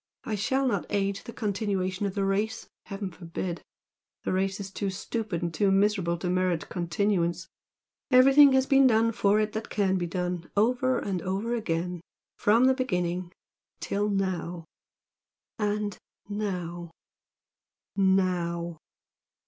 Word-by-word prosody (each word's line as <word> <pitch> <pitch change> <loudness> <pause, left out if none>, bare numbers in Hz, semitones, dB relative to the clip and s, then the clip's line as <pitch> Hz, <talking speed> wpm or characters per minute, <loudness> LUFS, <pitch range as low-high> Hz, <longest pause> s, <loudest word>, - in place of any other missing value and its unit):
I 220 - -4
shall 260 +7 +1
not 250 - -1
aid 200 -1 0
in - - -12
the - - -7
continuation 200 -3 -1
of 190 - -5
the 200 -1 0
race, 200 +3 -1 0.2
heaven 195 -1 -5
forbid! 170 0 -5 0.6
The - - -1
race 190 +1 0
is 195 -1 -6
too 200 0 -2
stupid 200 -1 -3
and 170 -1 -2
too 195 +5 +2
miserable 195 -3 +2
to 175 - -4
merit 180 -2 0
continuance. 175 -1 0 0.6
Everything 270 +2 +7
has 265 0 +4
been 270 -1 +5
done 225 -1 +3
for 205 -1 +2
it 215 0 0
that 220 +1 -4
can 190 -2 +1
be 175 - -2
done, 180 0 -3
over 250 +4 +2
and 190 -3 -2
over 195 +7 -2
again, 180 -5 -2 0.3
from 225 +4 +4
the 260 - +5
beginning 180 -8 -2 0.5
till 205 +1 -1
now, 180 -4 -2 0.9
and 210 -1 -1 0.3
now 180 -5 -4 1.1
NOW!" 175 -4 +1
195 Hz, 140 wpm, -27 LUFS, 180-215 Hz, 1.1 s, Everything